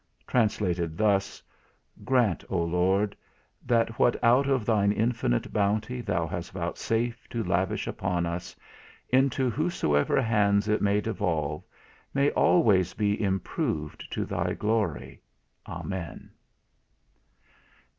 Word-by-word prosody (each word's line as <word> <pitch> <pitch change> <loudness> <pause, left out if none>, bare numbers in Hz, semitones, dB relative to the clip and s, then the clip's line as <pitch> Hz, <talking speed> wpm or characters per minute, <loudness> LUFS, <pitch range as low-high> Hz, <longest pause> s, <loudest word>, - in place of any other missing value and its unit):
TRANSLATED 90 -8 0
THUS. 100 -2 +1 0.6
Grant, 125 -8 +2
Oh 90 -3 0
Lord! 95 +4 +1 0.5
that 115 -1 +1
what 120 - +4
out 125 +4 +4
of 130 -5 +1
Thine 105 -3 +3
infinite 110 - 0
bounty 110 +4 0
Thou 95 -7 -1
hast 85 +2 -6
vouchsafed 115 +7 -2
to 115 -1 -2
lavish 90 0 0
upon 90 -2 -2
us, 85 +1 -5 0.5
into 130 0 +2
whosoever 120 - +1
hands 105 -4 +2
it 105 0 +1
may 105 0 +2
devolve, 80 -9 -2 0.5
may 140 +1 +3
always 95 - +3
be 105 0 0
improved 95 -6 -2
to - - -2
thy - - -2
glory. 105 -7 -2 0.5
Amen. 95 -3 -6
105 Hz, 110 wpm, -27 LUFS, 90-115 Hz, 0.6 s, what